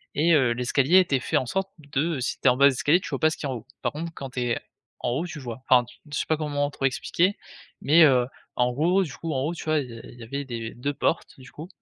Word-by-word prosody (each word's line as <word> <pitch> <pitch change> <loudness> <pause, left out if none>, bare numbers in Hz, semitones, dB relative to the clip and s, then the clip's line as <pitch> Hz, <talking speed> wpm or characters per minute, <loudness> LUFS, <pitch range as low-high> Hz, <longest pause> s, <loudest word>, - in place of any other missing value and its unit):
et 165 +3 +3
heu, 130 -6 +4
l'escalier 130 +8 +3
était 145 -8 +2
fait - - 0
en - - 0
sorte 195 +9 -2
de 150 +1 -2
si 125 - -3
tu - - +1
es - - +9
en 125 - +3
bas 140 - +6
de - - +9
l'escalier, 140 +6 +2
tu - - -7
vois 135 - -3
pas 155 - +4
ce - - -5
qui - - -6
a - - -2
en 130 - -2
haut. 115 - -8 0.2
Par - - 0
contre, 165 +3 -5
quand 135 - -6
tu 125 - -4
es 120 -1 0 0.4
en - - -2
haut 140 +8 -1
tu 165 -3 -7
vois. 125 -2 -7
Enfin, 125 -1 +6 0.3
je 145 - -2
sais - - -1
pas 155 - +1
comment 145 -2 -1
trop 135 - -3
expliquer, 175 +8 +1 0.4
mais, 160 +4 +6
heu, 130 -4 +4 0.3
en 125 0 +2
gros 170 +9 +2
du 150 -6 -7
coup 165 -1 -4
en 130 - -1
haut, 155 +4 -1
tu 170 - -8
vois 155 -1 +2
il 130 -3 -5
y 115 - -9
a - - -10
il 120 - -13
y - - -9
avait 140 +5 -5
des 115 -3 -5
2 140 +4 -3
portes 165 +1 -2
du 130 - -14
coup 155 +3 -9
140 Hz, 305 wpm, -25 LUFS, 125-155 Hz, 0.4 s, es